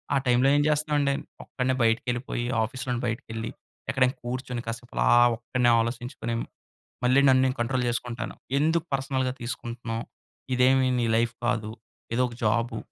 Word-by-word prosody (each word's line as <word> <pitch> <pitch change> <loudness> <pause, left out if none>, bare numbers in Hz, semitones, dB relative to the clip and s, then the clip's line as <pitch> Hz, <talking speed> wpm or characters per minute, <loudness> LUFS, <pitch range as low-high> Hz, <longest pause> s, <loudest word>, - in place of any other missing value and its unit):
ఆ - - +5
టైమ్‌లో 125 +1 +4
ఏం 145 - +4
చేస్తామండి, 150 -2 +1 0.3
ఒక్కడినే 130 0 -1
బయటికెళ్ళిపోయి, 120 +2 0 0.2
ఆఫీస్‌లో 125 +2 -4
బయటికి 115 -1 -3
కెళ్లి, 115 0 -4 0.4
ఎక్కడైనా 130 0 +2
కూర్చొని, 125 0 -4
కాసేపు 115 +1 -6
అలా - - +3 0.3
ఒక్కడినే 120 +1 +1
ఆలోచించుకొని, 120 0 -4 0.7
మళ్ళీ 130 +2 +5
నన్ను 130 0 +5
నేను 130 0 0
కంట్రోల్ 125 +2 0
చేసుకుంటాను. 120 0 -4 0.2
ఎందుకు 160 +2 +2
పర్సనల్‌గా 130 -1 0
తీసుకుంటున్నావు. 120 -1 -4 0.5
ఇదేమి 130 +1 +4
నీ 120 - +1
లైఫ్ 115 0 +1
కాదు. 115 -3 0 0.4
ఇదో 125 - +3
ఒక 120 - -9
జాబు, 115 +1 +1
125 Hz, 140 wpm, -26 LUFS, 115-130 Hz, 0.7 s, ఆ